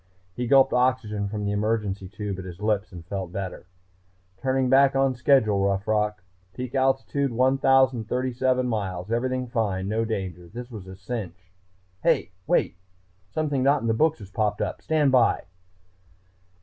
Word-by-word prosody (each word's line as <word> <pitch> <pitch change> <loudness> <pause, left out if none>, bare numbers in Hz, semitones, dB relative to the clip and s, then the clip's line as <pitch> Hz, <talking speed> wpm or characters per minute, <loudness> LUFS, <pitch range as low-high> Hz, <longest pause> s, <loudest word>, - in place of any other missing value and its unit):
He 120 +4 -3
gulped 135 +1 +5
oxygen 125 -5 +1
from 105 0 -4
the 100 - 0
emergency 105 -2 -1
tube 105 -2 -5
at 95 - -7
his 90 -1 -9
lips 105 -1 0
and 85 -3 -10
felt 95 -1 -5
better. 95 -1 -6 0.7
"Turning 130 +1 0
back 135 +1 +5
on 135 -1 +3
schedule, 120 -6 +3
Rough 100 0 0
Rock. 105 -1 0 0.3
Peak 125 -1 -5
altitude 135 +1 +1
1037 130 0 +2
miles. 100 -4 -3
Everything 130 +2 0
fine, 105 -6 -1
no 110 +2 0
danger. 95 -6 -4
This 120 +6 -9
was 105 -5 -9
all 95 - -8
a - - -10
cinch.... 95 -3 -7 0.5
HEY! - - +2 0.2
Wait.... - - +1 0.5
Something 145 +4 -1
not 140 +2 +3
in - - -1
the 115 - +2
books 155 +7 +2
has 100 -3 -12
popped 105 -1 0
up... - - -3
stand 150 -3 +2
by!" 125 -3 +3
110 Hz, 160 wpm, -25 LUFS, 100-130 Hz, 0.7 s, gulped